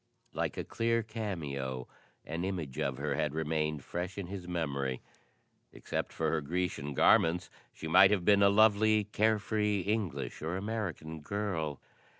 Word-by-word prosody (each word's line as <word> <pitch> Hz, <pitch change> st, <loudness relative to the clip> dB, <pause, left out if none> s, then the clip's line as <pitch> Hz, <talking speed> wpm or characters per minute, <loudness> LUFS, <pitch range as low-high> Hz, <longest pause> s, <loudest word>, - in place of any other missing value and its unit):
Like -, -, -2 dB
a -, -, -2 dB
clear 115 Hz, 0 st, 0 dB
cameo, 75 Hz, -, -4 dB, 0.4 s
an 85 Hz, +2 st, -3 dB
image 85 Hz, -9 st, -3 dB
of 65 Hz, -2 st, -1 dB
her -, -, -1 dB
had 75 Hz, 0 st, -1 dB
remained 75 Hz, -2 st, -1 dB
fresh 90 Hz, +2 st, -4 dB
in 100 Hz, -, -3 dB
his 90 Hz, -1 st, -7 dB
memory. 70 Hz, -7 st, -2 dB, 0.7 s
Except -, -, -4 dB
for 80 Hz, -1 st, -1 dB
her 80 Hz, -, 0 dB
Grecian 75 Hz, -3 st, -2 dB
garments 85 Hz, +6 st, +4 dB, 0.2 s
she 80 Hz, -, -7 dB
might 95 Hz, +4 st, +7 dB
have 100 Hz, -4 st, +1 dB
been 100 Hz, -1 st, +5 dB
a 100 Hz, -, +7 dB
lovely, 110 Hz, +1 st, +5 dB
carefree 105 Hz, -1 st, +1 dB
English 90 Hz, -, -2 dB
or 80 Hz, +4 st, -2 dB
American 95 Hz, -7 st, -4 dB
girl. 80 Hz, -5 st, -2 dB
90 Hz, 150 wpm, -32 LUFS, 75-105 Hz, 0.7 s, might